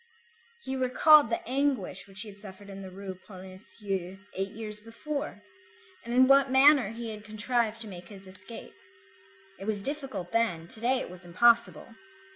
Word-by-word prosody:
He 265 - -3
recalled 265 +2 +6
the 230 - -3
anguish 255 -8 -1
which 195 +1 -10
he 220 - -7
had 200 0 -13
suffered 200 0 -11
in 195 0 -8
the 190 - -8
Rue 190 +1 -7
Polonceau 190 -1 -6 0.2
eight 195 +1 -2
years 210 0 -7
before, 230 +1 -5 0.6
and 235 - -7
in 255 +2 +6
what 275 0 +6
manner 265 -3 +6
he 230 0 -6
had 210 -1 -9
contrived 220 +1 -1
to 225 - -8
make 180 -3 -10
his 195 0 -12
escape; 190 +5 -10 0.9
it - - -7
was 205 -2 -2
difficult 265 - -5
then, 200 -8 0
to - - +1
day 250 +3 +2
it - - -7
was 180 -1 -11
impossible. 225 +2 +3
215 Hz, 170 wpm, -29 LUFS, 195-250 Hz, 0.9 s, recalled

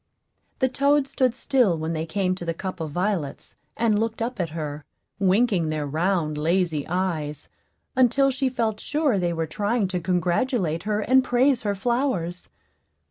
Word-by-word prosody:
The 260 - +2
toads 280 +1 +2
stood 255 -2 +1
still 250 -9 +2
when 160 +1 -3
they 160 0 -3
came 185 +2 0
to 185 - -6
the 165 -1 -2
cup 185 +1 -5
of 160 -1 -3
violets, 175 -3 -3 0.2
and 220 -3 +2
looked 225 0 -2
up 235 0 -3
at 170 -3 -1
her, 150 -2 -5 0.4
winking 195 -3 +2
their 155 -1 -2
round, 155 0 0
lazy 165 -2 0
eyes, 165 -5 -2 0.5
until 265 +2 +4
she 265 0 0
felt 225 -4 -1
sure 295 -8 +1
they 175 -1 0
were 165 -1 -1
trying 205 +6 0
to 180 -1 -1
congratulate 180 - 0
her 210 0 +1
and 260 +4 +4
praise 255 +1 +2
her 205 -2 -1
flowers. 195 -6 -1
190 Hz, 165 wpm, -24 LUFS, 165-245 Hz, 0.5 s, until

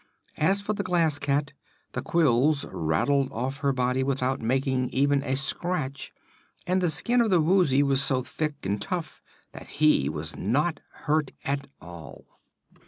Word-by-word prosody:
As 195 +6 +2
for 210 +1 -2
the 200 - -3
Glass 170 -6 +1
Cat, 145 0 -1 0.4
the - - -4
quills 145 -2 +2
rattled 95 - 0
off 130 +4 -3
her 140 -1 0
body 125 0 0
without 135 0 -1
making 130 +2 0
even 140 +1 +2
a 135 -1 -1
scratch, 140 0 -1 0.5
and 185 +1 +1
the 175 - +2
skin 240 +10 +2
of 230 - +1
the 180 -3 +4
Woozy 155 -5 +3
was 135 -1 +4
so 130 -2 +1
thick 150 0 -4
and 100 +1 -2
tough 170 - -5 0.3
that - - -11
he 150 - +3
was 75 +2 -4
not 145 - 0 0.2
hurt 150 -1 +1 0.2
at 140 0 -2
all. 85 -2 -11
140 Hz, 160 wpm, -26 LUFS, 130-155 Hz, 0.5 s, the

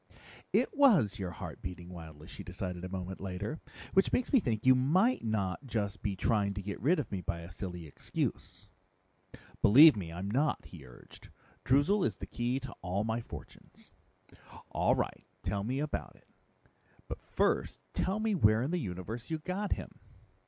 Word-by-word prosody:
"It - - +2
was 190 - +5
your 95 -2 -2
heart 85 - -8
beating 90 -1 -7
wildly," 80 -3 -10
she - - -9
decided 90 -1 -5
a 95 - -4
moment 95 0 -5
later. 95 - -4 0.3
"Which 190 - +4
makes 250 - 0
me 265 - +8
think 115 - -2
you 130 - +8
might 180 - +3
not 110 +2 -1
just 105 -3 -2
be 100 -2 -1
trying 100 0 +1
to 100 - -3
get 100 +1 -5
rid 160 - +4
of 145 - -3
me 95 -2 -2
by 85 -1 -3
a 85 +1 -10
silly 90 -1 -6
excuse." 75 - -4 1.0
"Believe 145 +9 +9
me, 90 -5 -5
I'm 90 +4 -4
not," 145 +6 +1
he - - -11
urged. - - -15 0.3
"Droozle 145 +10 +3
is 100 - 0
the - - -6
key 120 +2 -1
to 130 -1 -7
all 95 +3 -1
my 110 +1 -1
fortunes." - - -12 0.8
"All - - +3
right, - - -3 0.2
tell 100 +2 -1
me 125 +5 -1
about 150 +1 -3
it. - - -24 0.8
But - - -6
first - - 0
tell 195 +3 0
me 220 0 +1
where 110 - +4
in 140 - -1
the 180 - +1
universe 105 - -5
you 160 - 0
got 185 +6 -2
him." - - -8
110 Hz, 180 wpm, -32 LUFS, 90-145 Hz, 1.0 s, Believe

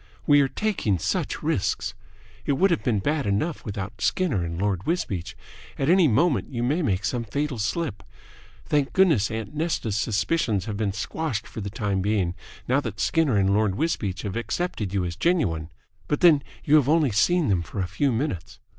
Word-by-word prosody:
We 145 -1 +6
are 135 - +3
taking 180 - 0
such - - -2
risks. - - -1 0.5
It 140 - +3
would 190 +8 +3
have 170 - 0
been 110 -6 +1
bad 145 +1 0
enough 105 +12 -1
without 100 -3 -6
Skinner 150 - +1
and 85 0 -4
Lord 95 -2 -1
Wisbeach. 95 - -2 0.4
At 135 - 0
any 180 -2 +6
moment 140 +5 +2
you 120 -3 -3
may 145 +8 +1
make 100 - 0
some 120 +3 -1
fatal 135 +3 -3
slip. 115 - -2 0.6
Thank 145 -2 0
goodness, 160 - +4
aunt 110 +4 -5
Nesta's 155 -9 -1
suspicions 105 - 0
have 105 - -4
been 105 -1 -1
squashed 120 +2 -3
for 110 - -7
the 100 - -4
time 100 -2 -1
being 95 -3 0 0.3
now 130 +3 +3
that 110 -6 -6
Skinner 155 -9 +2
and 100 0 +3
Lord 105 -2 +2
Wisbeach 110 - -1
have 100 -3 -4
accepted 115 - -2
you 95 -2 0
as 85 -1 -4
genuine. 85 - 0 0.4
But 150 - -1
then 160 -5 +6 0.2
you 150 +2 +5
have 140 -2 +2
only 155 -5 +3
seen 160 - +2
them 95 -4 +2
for 90 - -7
a 95 - +1
few 115 +10 0
minutes. 115 - -3
115 Hz, 190 wpm, -25 LUFS, 100-150 Hz, 0.6 s, We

